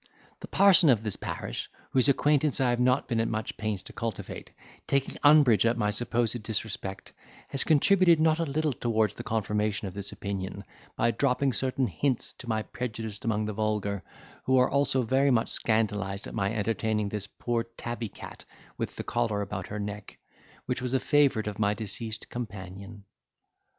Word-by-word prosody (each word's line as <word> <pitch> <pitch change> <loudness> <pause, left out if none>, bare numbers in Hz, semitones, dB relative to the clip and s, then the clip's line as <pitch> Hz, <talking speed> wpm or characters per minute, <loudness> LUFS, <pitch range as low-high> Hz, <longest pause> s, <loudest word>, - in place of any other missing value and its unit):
The - - -8
parson 190 -5 +6
of 115 -4 +4
the 105 -3 -2
parish, - - -4 0.2
whose 130 +1 +3
acquaintance 145 +1 +2
I 130 -2 +3
have 120 - 0
not 125 +2 +2
been 115 -3 0
at 115 - +1
much 110 0 -3
pains 110 -3 -3
to - - -11
cultivate, 115 -4 -5 0.4
taking 140 -1 0
umbrage 145 -8 +6
at 115 0 +2
my 105 -2 +1
supposed 120 +1 0
disrespect, 105 -3 -4 0.4
has 135 - -1
contributed 170 +2 +5
not 160 0 +3
a 165 - +1
little 150 +1 0
towards 110 -4 +1
the - - -7
confirmation 105 -1 -1
of 95 - -7
this 100 -1 -6
opinion, 100 0 -5 0.3
by 115 +1 +2
dropping 135 +1 +1
certain 130 +1 +1
hints 130 0 -1
to 120 - -8
my 110 -1 0
prejudice 110 -1 -5
among 110 -3 0
the 110 - -3
vulgar, 105 -2 -1 0.4
who 130 0 +3
are 125 - +4
also 140 -2 +2
very 135 +4 +3
much 120 -3 +2
scandalised 105 -3 0
at - - -8
my 100 -2 0
entertaining 110 -1 -1
this 100 -1 -5
poor 120 +3 -2 0.2
tabby 120 -2 -4
cat - - -11 0.4
with - - -3
the - - -5
collar 115 -4 0
about 95 -2 -5
her 105 - -5
neck, 105 0 -6 0.5
which 125 0 -2
was 125 +1 -1
a - - +3
favourite 140 -7 +3
of 105 -1 -5
my 105 0 +2
deceased 110 +1 -5
companion." 100 -3 -7
115 Hz, 175 wpm, -28 LUFS, 105-130 Hz, 0.5 s, parson